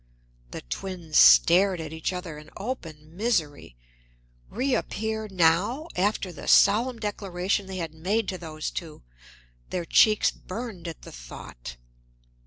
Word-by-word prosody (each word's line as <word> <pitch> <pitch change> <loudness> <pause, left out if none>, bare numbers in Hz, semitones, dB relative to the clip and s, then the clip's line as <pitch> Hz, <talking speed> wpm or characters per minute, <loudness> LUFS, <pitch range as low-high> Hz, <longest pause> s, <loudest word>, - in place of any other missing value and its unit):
The - - -7
twins 165 - -6
stared 185 +1 +6
at 160 -1 -6
each 160 +2 -2
other 180 -4 -6
in 150 +1 -14
open 165 -9 -7
misery. 165 - -1 0.7
Reappear 220 -3 -2
now, 190 - +2
after 195 0 0
the 170 - -10
solemn 230 +5 +5
declaration 200 -2 -2
they 190 -1 -6
had 165 -3 -4
made 195 +7 -1
to 185 - -4
those 155 -2 -5
two! 160 -3 -7 0.7
Their 175 -2 -3
cheeks 215 +4 +4
burned 205 -4 -7
at 165 - -8
the - - -10
thought. - - -10
180 Hz, 130 wpm, -26 LUFS, 160-210 Hz, 0.7 s, stared